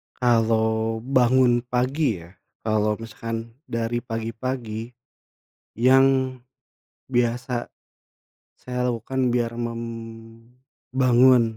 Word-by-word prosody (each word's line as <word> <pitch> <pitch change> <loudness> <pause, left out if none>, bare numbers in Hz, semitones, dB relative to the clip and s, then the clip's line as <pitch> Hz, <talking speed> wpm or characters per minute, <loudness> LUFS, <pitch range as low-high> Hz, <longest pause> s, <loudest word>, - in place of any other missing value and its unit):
kalau 110 -2 +1
bangun 125 -1 +4
pagi 125 - 0
ya, 85 - -15 0.3
kalau 105 -1 +1
misalkan 115 +1 -6 0.2
dari 115 +1 -1
pagi-pagi 115 0 -4 0.8
yang 130 +1 +4 0.7
biasa, 120 0 0 0.9
saya 125 0 -3
lakukan 125 +2 -1
biar 120 -1 -1
membangun 120 +2 0
120 Hz, 75 wpm, -24 LUFS, 115-125 Hz, 0.9 s, bangun